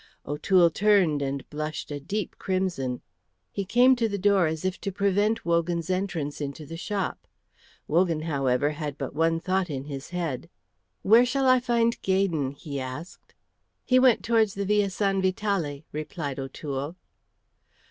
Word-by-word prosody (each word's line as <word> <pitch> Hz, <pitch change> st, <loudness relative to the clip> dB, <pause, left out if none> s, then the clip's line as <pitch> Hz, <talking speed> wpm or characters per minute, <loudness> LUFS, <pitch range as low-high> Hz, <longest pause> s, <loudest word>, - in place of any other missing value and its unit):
O'Toole 170 Hz, +4 st, +3 dB
turned 185 Hz, -6 st, +3 dB
and 140 Hz, 0 st, -3 dB
blushed 155 Hz, 0 st, -4 dB
a 145 Hz, -, -3 dB
deep 200 Hz, +9 st, -4 dB
crimson. 180 Hz, -10 st, -1 dB, 0.5 s
He 200 Hz, -, -3 dB
came 245 Hz, +5 st, +5 dB
to 230 Hz, -2 st, +1 dB
the 200 Hz, -, -2 dB
door 195 Hz, -3 st, +3 dB
as 160 Hz, +2 st, -3 dB
if 185 Hz, 0 st, -2 dB
to 195 Hz, -, -3 dB
prevent 200 Hz, +3 st, +1 dB
Wogan's 170 Hz, +1 st, 0 dB
entrance 175 Hz, -7 st, -2 dB
into 145 Hz, +2 st, -5 dB
the 165 Hz, -, -8 dB
shop. 195 Hz, +2 st, -3 dB, 0.6 s
Wogan, 165 Hz, -1 st, +2 dB
however, 140 Hz, -2 st, +1 dB
had 150 Hz, -2 st, -5 dB
but 135 Hz, -, -5 dB
one 165 Hz, +2 st, +2 dB
thought 185 Hz, +1 st, 0 dB
in 135 Hz, -3 st, -4 dB
his 140 Hz, -2 st, -7 dB
head. 165 Hz, -5 st, -3 dB, 0.5 s
"Where 225 Hz, +5 st, +7 dB
shall 265 Hz, +2 st, 0 dB
I 255 Hz, 0 st, +6 dB
find 235 Hz, -1 st, +1 dB
Gaydon?" 180 Hz, -8 st, +1 dB
he 140 Hz, -1 st, -6 dB
asked. 130 Hz, +7 st, -8 dB, 0.5 s
"He 255 Hz, -1 st, +4 dB
went 255 Hz, -3 st, +4 dB
towards 225 Hz, -3 st, +2 dB
the 200 Hz, 0 st, -2 dB
Via 205 Hz, 0 st, +2 dB
San 195 Hz, 0 st, 0 dB
Vitale," 185 Hz, -6 st, -1 dB
replied 150 Hz, -2 st, -4 dB
O'Toole. 140 Hz, +3 st, -5 dB
175 Hz, 155 wpm, -26 LUFS, 145-200 Hz, 0.6 s, Where